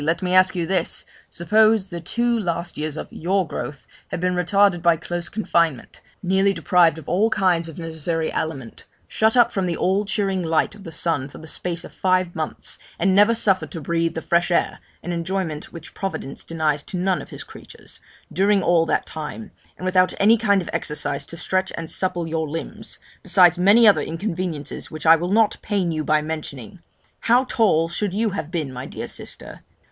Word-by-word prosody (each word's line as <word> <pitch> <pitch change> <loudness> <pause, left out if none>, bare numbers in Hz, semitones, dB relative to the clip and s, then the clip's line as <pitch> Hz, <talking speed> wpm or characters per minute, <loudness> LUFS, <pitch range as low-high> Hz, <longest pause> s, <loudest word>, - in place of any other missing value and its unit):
let 165 +4 0
me 180 0 0
ask 185 0 +5
you 175 -2 -1
this 190 +2 -1 0.2
suppose 215 +2 +3
the 170 -1 -6
two 235 +6 0
last 170 -3 -3
years 155 0 -3
of - - -5
your 185 +2 0
growth 145 -2 -6 0.2
had - - -4
been 180 +1 0
retarded 180 +1 +3
by 170 -1 +4
close 175 +1 -4
confinement 170 - -1 0.2
nearly 190 +2 +2
deprived 175 -4 +3
of 160 - -11
all 205 +5 +2
kinds 175 -5 +1
of 160 - -11
necessary 165 -1 -2
aliment 135 -7 -4 0.2
shut 220 +2 +2
up 235 -1 +5
from 190 -2 0
the 170 - -2
all 190 +3 +1
cheering 200 -2 -1
light 160 -2 +1
of 205 - -13
the 165 - -7
sun 160 -6 -1
for - - -12
the 160 - -11
space 170 +2 -4
of - - -12
five 185 -2 +1
months, 155 -2 -4 0.2
and 195 - +2
never 210 +4 +5
suffered 195 -4 +1
to 165 - -7
breathe 165 +2 -1
the 160 - -4
fresh 170 +1 +2
air 175 - 0 0.2
(an 175 - -4
enjoyment 170 -2 -3
which 165 -2 -11
Providence 195 -8 -5
denies 155 -3 -1
to 180 - -6
none 185 0 0
of - - -11
His - - -7
creatures) - - -14 0.3
during 195 0 +3
all 170 -1 +3
that - - 0
time 160 +8 -7 0.3
and 185 - -7
without 185 0 +3
any 215 +3 +6
kind 200 -4 +2
of - - -9
exercise 145 -2 -2
to 170 - -9
stretch 190 +2 -1
and 165 -1 -5
supple 175 -2 -1
your 160 -1 -2
limbs 165 +2 -6 0.2
besides 180 -2 +4
many 210 +5 +6
other 205 - +6
inconveniences 165 -3 -4
which 155 0 -8
I 165 +1 +8
will 175 +3 -3
not 220 0 +3
pain 195 -5 -1
you 155 -1 -2
by 150 0 +2
mentioning 155 -1 -6 0.4
how 240 +2 +3
tall 205 -11 +2
should 190 +3 -2
you 220 0 +1
have 160 -5 -4
been, 155 -7 -3
my 125 +1 -6
dear - - -6
sister? - - -8
175 Hz, 195 wpm, -22 LUFS, 160-195 Hz, 0.4 s, I